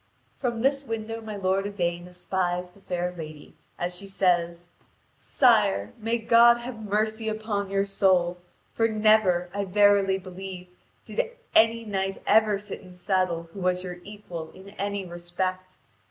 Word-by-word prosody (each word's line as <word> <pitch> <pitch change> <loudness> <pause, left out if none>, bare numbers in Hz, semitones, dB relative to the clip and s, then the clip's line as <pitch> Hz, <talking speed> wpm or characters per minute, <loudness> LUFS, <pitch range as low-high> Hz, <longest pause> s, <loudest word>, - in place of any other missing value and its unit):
From 240 -3 -2
this 275 +1 +2
window 225 -2 -4
my 215 -1 -6
lord 195 0 0
Yvain 175 -3 -2
espies 180 0 -2
the 200 - -21
fair 180 -1 -2
lady, 155 -3 -9 0.2
as 175 +1 -3
she 195 +2 -7
says: 175 -2 0 0.5
"Sire, 100 +1 +3
may 225 +2 0
God 235 +1 +6
have 235 -2 -7
mercy 215 +2 -1
upon 215 -2 -2
your 195 0 +1
soul! 185 -3 +2 0.3
For 225 - +2
never, 215 -5 +3
I 200 0 -1
verily 200 0 +4
believe, 185 -1 -8 0.4
did - - 0 0.3
any 225 +1 +4
knight 195 -2 -2
ever 215 -2 +4
sit 205 0 -7
in 180 -1 -14
saddle 180 -2 -1
who 200 - -8
was 180 0 0
your 180 -1 -6
equal 180 -6 -8
in 190 +1 -13
any 200 -1 -3
respect. 185 +1 -4
195 Hz, 150 wpm, -26 LUFS, 180-215 Hz, 0.5 s, God